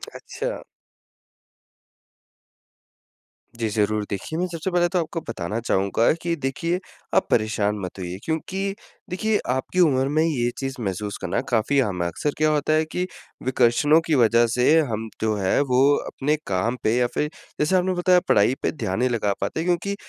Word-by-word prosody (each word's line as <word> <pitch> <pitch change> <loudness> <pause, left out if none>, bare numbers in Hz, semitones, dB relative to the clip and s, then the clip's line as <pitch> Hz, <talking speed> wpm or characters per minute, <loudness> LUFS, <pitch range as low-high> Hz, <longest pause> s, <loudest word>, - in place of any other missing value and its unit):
अच्छा। - - -5 3.0
जी, 115 - 0
ज़रूर। 105 0 0
देखिए 100 +10 -4
मैं 180 - +1
सबसे 170 +1 -4
पहले 175 0 +3
तो 180 +1 +1
आपको 165 0 -3
बताना 105 0 -3
चाहूँगा 100 0 +2
कि 170 -1 -1
देखिए 165 +7 -1 0.4
आप - - +3
परेशान 105 -2 +1
मत 90 - -8
होइए। 90 0 -5
क्योंकि 190 +5 -2 0.3
देखिए 210 +4 0
आपकी 130 +8 -2
उम्र 135 -6 +4
में 155 +2 +2
ये 130 -7 +1
चीज़ 135 -1 -3
महसूस 100 0 -3
करना 90 +4 -1
काफ़ी 120 +4 +2
आम 90 -3 -3
है। - - 0
अक्सर 145 - -2
क्या 155 0 +3
होता 150 0 +1
है 155 0 +3
कि 180 - -1 0.4
विकर्षणों 130 +5 +4
की 160 - +2
वजह 115 -1 +4
से 125 +6 +4
हम 110 +1 -3
जो 110 -1 +1
है 95 -2 +1
वो 130 -2 +3 0.2
अपने 150 +3 0
काम 105 +6 0
पे 110 - +2
या 125 -1 +3
फिर 150 - 0 0.3
जैसे 150 +5 +2
आपने 185 0 +2
बताया 180 0 +4
पढ़ाई 105 +5 +4
पे, - - 0
ध्यान 110 -10 -3
नहीं 130 +1 +2
लगा 105 -4 0
पाते 100 +11 -2
क्योंकि 180 +3 0
130 Hz, 170 wpm, -23 LUFS, 110-165 Hz, 3.0 s, उम्र